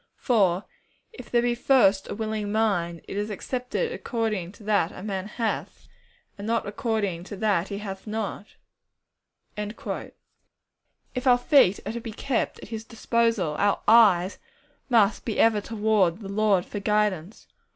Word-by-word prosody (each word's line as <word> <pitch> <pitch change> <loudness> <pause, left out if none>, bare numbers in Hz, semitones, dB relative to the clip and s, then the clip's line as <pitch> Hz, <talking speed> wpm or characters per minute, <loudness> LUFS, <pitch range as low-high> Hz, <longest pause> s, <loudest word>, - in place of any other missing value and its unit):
For 195 -7 +2 0.5
if - - -11
there 240 -1 +2
be 240 0 +2
first 240 -6 +3
a - - -4
willing 215 -1 -3
mind, 175 -6 0
it - - -6
is 205 +1 -2
accepted 250 - -3
according 220 - -2
to 210 - -16
that 200 -5 +1
a 185 - -10
man 195 -2 -3
hath, 225 +1 -4 0.5
and 205 - -5
not 230 0 0
according 200 -5 -2
to 205 - -7
that 200 -3 +1
he 200 - -5
hath 195 -1 -7
not.' 210 -1 -5 1.0
If 220 +4 -8
our 245 -1 +7
feet 245 - +4
are - - -2
to 235 +1 -5
be 225 -1 -7
kept 255 +2 -1
at - - -10
His 220 -1 -5
disposal, 230 -7 0
our 205 0 +2
eyes 205 -5 +5 0.5
must 220 -4 +3
be 225 - -3
ever 220 -2 +4
toward 210 -4 +1
the 195 - -7
Lord 200 -3 +2
for 205 - -5
guidance. 210 -3 -1
210 Hz, 150 wpm, -26 LUFS, 195-230 Hz, 1.0 s, our